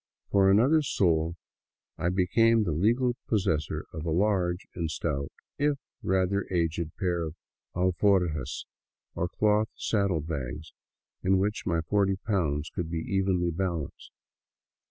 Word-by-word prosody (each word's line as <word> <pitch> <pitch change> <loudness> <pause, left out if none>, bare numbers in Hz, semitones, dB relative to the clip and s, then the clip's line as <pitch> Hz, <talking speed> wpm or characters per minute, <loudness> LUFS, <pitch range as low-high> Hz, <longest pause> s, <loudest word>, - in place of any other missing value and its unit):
For 95 -1 +5
another 130 +11 +5
sol 85 - +1 0.6
I 85 - -1
became 110 +5 +3
the 90 - -1
legal 120 - +2
possessor 80 -9 0
of 80 -1 -5
a 85 - -2
large 90 0 +1
and 85 -2 -2
stout, 70 -3 -2 0.3
if 145 0 +2 0.2
rather 95 +1 +1
aged, 85 -2 -1
pair 90 -3 0
of 80 -1 -4 0.4
alforjas, 90 - +1 0.5
or 85 - -2
cloth 105 +2 +2
saddle 100 -7 0
bags, 75 -1 -5 0.5
in 95 +1 +3
which 100 +1 -1
my 85 -3 +1
forty 95 +3 +1
pounds 80 -8 -1
could 85 -2 -3
be 85 - -2
evenly 90 0 0
balanced. 85 -4 -3
90 Hz, 130 wpm, -28 LUFS, 80-100 Hz, 0.6 s, For